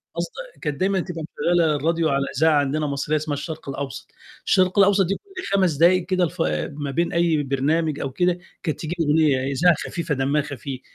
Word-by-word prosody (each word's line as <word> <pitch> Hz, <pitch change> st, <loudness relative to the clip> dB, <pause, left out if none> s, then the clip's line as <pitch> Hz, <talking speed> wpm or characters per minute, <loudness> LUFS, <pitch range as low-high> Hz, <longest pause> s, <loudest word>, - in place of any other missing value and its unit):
قصد -, -, -3 dB, 0.3 s
كانت 150 Hz, -3 st, -3 dB
دايمًا 190 Hz, 0 st, +1 dB
تبقى 170 Hz, -2 st, -5 dB
مشغلة 165 Hz, -1 st, +2 dB
الراديو 160 Hz, +2 st, +1 dB
على 140 Hz, 0 st, +1 dB
إذاعة 155 Hz, 0 st, +4 dB
عندنا 150 Hz, +2 st, 0 dB
مصرية 140 Hz, +2 st, -1 dB
اسمها 150 Hz, -1 st, -3 dB
الشرق 155 Hz, 0 st, -6 dB
الأوسط، 135 Hz, 0 st, -6 dB, 0.3 s
الشرق 185 Hz, +1 st, +3 dB
الأوسط 195 Hz, -1 st, +5 dB
كل 375 Hz, -, -5 dB
5 185 Hz, -5 st, +3 dB
دقائق 175 Hz, +4 st, +4 dB
كده 185 Hz, -2 st, +1 dB
الف 160 Hz, -, -2 dB, 0.3 s
ما 145 Hz, -1 st, -5 dB
بين 170 Hz, +6 st, 0 dB
أي 170 Hz, -3 st, +2 dB
برنامج 145 Hz, +3 st, 0 dB
أو 135 Hz, -, -3 dB
كده 180 Hz, +5 st, +1 dB, 0.2 s
كانت 155 Hz, -, -2 dB
تيجي 165 Hz, +2 st, -4 dB
أغنية 145 Hz, -4 st, +2 dB
إذاعة 170 Hz, +5 st, +4 dB
خفيفة 165 Hz, -4 st, -2 dB
دمها 140 Hz, +3 st, +1 dB
خفيف، 135 Hz, -1 st, -7 dB
155 Hz, 180 wpm, -23 LUFS, 140-175 Hz, 0.3 s, الأوسط